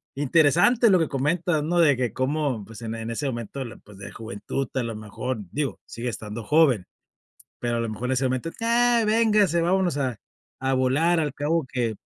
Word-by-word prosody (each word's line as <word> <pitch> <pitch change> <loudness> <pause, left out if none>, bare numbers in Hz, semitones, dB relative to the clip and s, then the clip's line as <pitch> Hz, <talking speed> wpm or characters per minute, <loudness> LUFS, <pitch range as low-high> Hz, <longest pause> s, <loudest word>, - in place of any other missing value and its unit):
interesante 165 - +4
lo 190 - +6
que 160 - 0
comentas, 155 +4 0
¿no?, 175 +3 0
de 145 -6 +5
que 125 -4 -1
cómo, 135 -4 -1
pues, 115 0 -11
en 115 0 -4
en 115 0 -5
ese 130 +6 -3
momento, 120 +2 -5 0.2
pues, 105 -1 -15
de 100 - -9
juventud 115 +4 -5
a 130 - +1
lo 115 -1 -4
mejor, 110 +3 -5
digo, 140 -8 -2
sigue 120 +1 -6
estando 110 0 -6
joven, 140 - +3 0.7
pero 120 -1 -1
a - - -1
lo 115 - -2
mejor 110 +3 -4
en - - +1
ese 130 +1 0
momento: 130 +5 -1
"Ya, 235 +1 +3
véngase, 210 -6 +3
vámonos 180 -1 +1
a 130 -5 -1 0.4
a 135 0 +1
volar, 145 +7 +2
al 150 -3 -2
cabo 150 +2 0
que 120 -4 -1
135 Hz, 195 wpm, -25 LUFS, 115-165 Hz, 0.7 s, lo